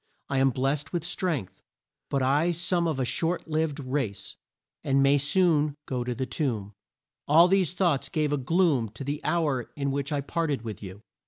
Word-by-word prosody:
I 135 - +1
am 135 0 +4
blessed 135 +5 -1
with 170 -3 -1
strength, 175 - -3 0.5
but 135 -2 0
I 145 +6 +2
some 175 0 0
of 155 -4 -1
a 130 - +1
short 165 +9 -1
lived 155 -1 -1
race, 130 -7 -3 0.5
and 135 0 +3
may 140 +1 +4
soon 150 -1 +2
go 125 -2 -2
to 125 0 -3
the 130 +2 -2
tomb. 115 -6 -3 0.5
All 165 +4 +7
these 185 -2 +2
thoughts 155 -8 +1
gave 150 -1 0
a - - +1
gloom 140 - +2
to 125 - -6
the 145 +2 -3
hour 145 -8 0
in 140 -1 -1
which 140 +2 -2
I 145 -1 0
parted 145 -3 -2
with 110 -2 -6
you." 100 +1 -9
140 Hz, 185 wpm, -27 LUFS, 130-165 Hz, 0.5 s, All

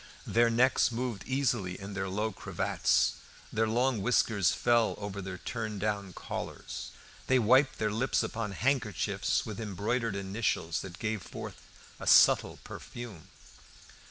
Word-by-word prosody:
Their 115 +1 +3
necks 125 +2 +3
moved 120 -3 -3
easily 120 -9 0
in 100 +1 -7
their 95 -1 -2
low 105 +3 -1
cravats, - - +1 0.4
their 110 +1 +2
long 120 0 +1
whiskers 105 -3 +3
fell 120 -2 +2
over 100 -1 -5
their 95 -1 -6
turned 110 -2 -4
down 100 -2 -2
collars, - - -6 0.4
they 130 - +4
wiped 130 +5 +4
their 105 -1 0
lips 115 +4 +1
upon 110 -3 -3
handkerchiefs 120 -4 0
with 110 +1 -6
embroidered 110 +2 -1
initials 95 -6 -1
that 90 -2 -8
gave 110 0 -2
forth - - -8 0.4
a - - -7
subtle - - +6
perfume. 115 -9 -9
110 Hz, 135 wpm, -30 LUFS, 100-120 Hz, 0.4 s, subtle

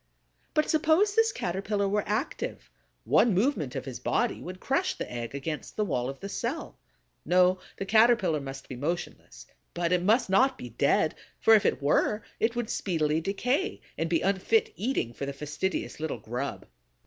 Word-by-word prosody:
But 305 -1 +3
suppose 320 +6 +3
this 450 +1 +3
Caterpillar 200 - -1
were 205 +1 +1
active? 220 +8 -3 0.3
One 230 -6 +4
movement 190 - 0
of - - -4
his 130 -3 -6
body 235 - 0
would 185 +1 -7
crush 355 - 0
the - - -6
egg 120 +2 -5
against 150 +2 -5
the 210 - 0
wall 125 -8 -1
of 135 - -8
the 200 - -4
cell. 240 +9 -4 0.4
No, 180 +1 +4 0.2
the 195 - -3
Caterpillar 215 -7 +4
must 135 0 -8
be 130 - -6
motionless; 135 - -5 0.3
but 170 0 0
it 180 -1 +3
must 220 +7 +3
not 255 +8 +3
be 125 - -8
dead, 140 +6 +2 0.3
for 225 - +6
if 215 - +5
it - - -1
were, 210 +8 +2 0.2
it 230 +2 +1
would 240 -2 -2
speedily 160 -4 0
decay 250 - -1 0.2
and 165 - -2
be 165 - +2
unfit 405 - +1
eating 220 - -1
for 140 - -5
the 140 - -3
fastidious 150 +7 -3
little 155 -5 -3
grub. 125 +6 -4
185 Hz, 175 wpm, -28 LUFS, 150-235 Hz, 0.4 s, for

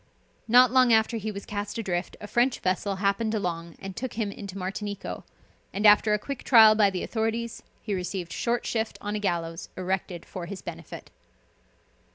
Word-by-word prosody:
Not 245 +1 +7
long 255 -2 +5
after 220 +1 +3
he 215 0 -3
was 200 -1 -7
cast 205 0 -4
adrift 185 -5 -3
a - - -8
French 240 +4 +1
vessel 190 +2 0
happened 200 +3 0
along 170 -4 -3
and 195 -1 -8
took 255 +1 -4
him 215 -3 -2
into 200 -2 -8
Martinico, 200 +2 -5 0.5
and 205 +2 -2
after 210 0 +6
a - - +1
quick 275 +5 -6
trial 220 -4 +8
by 210 -2 +4
the 185 -2 -4
authorities 225 +1 -2 0.2
he 210 - -3
received 180 -2 -4
short 240 0 -1
shift 220 -1 -2
on 205 0 -4
a - - -1
gallows 170 -4 -2
erected 185 -2 -3
for 175 -2 -7
his 195 0 -7
benefit. - - -9
205 Hz, 180 wpm, -27 LUFS, 190-225 Hz, 0.5 s, trial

